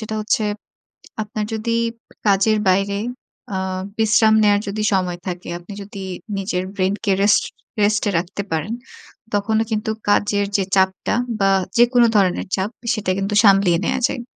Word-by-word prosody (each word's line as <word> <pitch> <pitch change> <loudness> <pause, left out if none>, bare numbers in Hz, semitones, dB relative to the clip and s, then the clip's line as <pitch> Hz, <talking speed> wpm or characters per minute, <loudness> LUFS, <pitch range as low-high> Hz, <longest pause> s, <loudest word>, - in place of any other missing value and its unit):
সেটা 220 0 -5
হচ্ছে 215 0 0 0.8
আপনার 210 0 -4
যদি 225 +1 -2 0.5
কাজের 200 +2 +4
বাইরে 195 +2 +1 0.6
আ - - 0 0.4
বিশ্রাম 220 0 +4
নেয়ার 205 -1 +4
যদি 210 +2 -3
সময় 180 -2 0
থাকে 180 -1 -5
আপনি 175 +4 -11
যদি 200 -1 -8 0.3
নিজের 185 -2 -2
brain 190 0 +1
কে 200 - +1
rest, 205 0 +4 0.4
rest 210 +1 +2
এ - - 0
রাখতে 180 +4 -3
পারেন, 165 +8 -1 0.6
তখনও 220 +2 +1
কিন্তু 215 0 -1 0.2
কাজের 205 0 +2
যে 195 - +1
চাপটা 190 +2 +1 0.2
বা 195 0 +3 0.3
যেকোন 240 0 +5
ধরনের 190 -2 +2
চাপ 190 +1 -1 0.2
সেটা 210 -4 -1
কিন্তু 200 +1 -2
সামলিয়ে 195 -4 +5
নেয়া - - 0
যায়। 250 - -4
200 Hz, 150 wpm, -20 LUFS, 190-215 Hz, 0.8 s, যেকোন